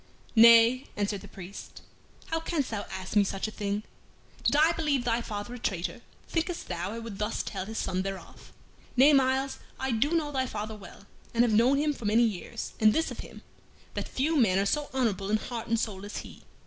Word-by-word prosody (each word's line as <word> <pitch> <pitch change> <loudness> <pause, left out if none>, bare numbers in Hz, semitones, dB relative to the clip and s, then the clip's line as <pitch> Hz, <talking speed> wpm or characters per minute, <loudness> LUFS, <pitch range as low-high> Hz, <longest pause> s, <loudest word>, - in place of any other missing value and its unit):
"Nay," 230 +3 +7
answered 205 -1 -1
the 205 - -11
priest, 190 0 -10 0.5
"how 325 - +1
canst 320 -6 -2
thou 205 -2 -3
ask 190 +2 -6
me 205 - +6
such 195 +1 -2
a - - -6
thing? 205 0 -2 0.6
Did - - +2
I 310 +3 +5
believe 300 -6 0
thy 235 0 +1
father 205 +1 -5
a 245 - -7
traitor, 185 -6 -3 0.3
thinkest 330 +1 -2
thou 175 +1 -3
I - - -5
would 230 -4 -7
thus 210 +2 -1
tell 190 -2 -5
his 220 0 -6
son 185 0 -1
thereof? 195 0 -7 0.5
Nay, 280 +4 +7
Myles, 265 0 +2 0.2
I 265 0 -1
do 275 +9 +1
know 305 -3 0
thy 260 -2 0
father 215 -1 -5
well, 200 -1 -13 0.3
and 235 - +5
have 235 -3 +2
known 245 +6 +5
him 295 +1 +1
for 235 - -9
many 220 +3 +4
years, 205 -7 -3
and 215 -1 +6
this 320 - 0
of - - -8
him, - - -10 0.5
that - - -3
few 305 +5 0
men 205 -8 +4
are 195 - +2
so 295 +7 0
honorable 215 -7 0
in 215 - +3
heart 230 0 -6
and 230 0 +1
soul 205 -4 -3
as 205 - -6
he. - - -9
225 Hz, 210 wpm, -28 LUFS, 205-265 Hz, 0.6 s, Nay